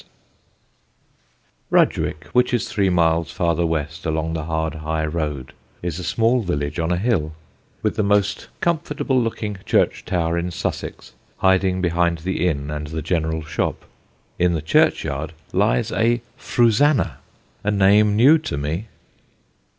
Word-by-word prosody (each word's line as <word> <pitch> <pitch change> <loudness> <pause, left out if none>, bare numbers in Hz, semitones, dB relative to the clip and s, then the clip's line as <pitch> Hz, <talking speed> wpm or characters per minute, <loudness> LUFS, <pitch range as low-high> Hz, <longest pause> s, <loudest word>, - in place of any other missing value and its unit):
[Sidenote: - - +4
RUDGWICK] - - -10 0.3
Rudgwick, - - -16
which 125 0 +3
is 120 - -1
three 100 -2 +1
miles 85 -3 +2
farther 85 -1 0
west 80 0 -3
along 80 0 -1
the 80 -2 -3
hard 80 -1 -1
high 80 0 -2
road, 75 -4 -3 0.3
is 85 -1 -3
a - - -5
small 115 +7 +2
village 75 -4 -2
on 80 +1 0
a 90 - +1
hill, 90 -7 0 0.5
with - - 0
the - - +3
most 100 0 +1
comfortable 150 -5 0
looking 110 -3 -3
church - - +1
tower 85 -1 0
in 85 +1 -2
Sussex 85 - -5 0.2
hiding 95 -1 +2
behind 85 -1 +1
the 95 -1 0
inn 70 -3 -2
and 75 0 -4
the 80 0 -5
general 80 -1 -1
shop. 80 - -3 0.5
In 90 0 +3
the 80 - -1
churchyard 75 0 +1 0.2
lies - - +2
a 120 +1 +1
Frusannah 120 +5 +2 0.5
a 105 - 0
name 105 +1 +4
new 140 +9 +6
to 150 - -4
me. 80 +9 -3
85 Hz, 150 wpm, -21 LUFS, 80-105 Hz, 0.5 s, new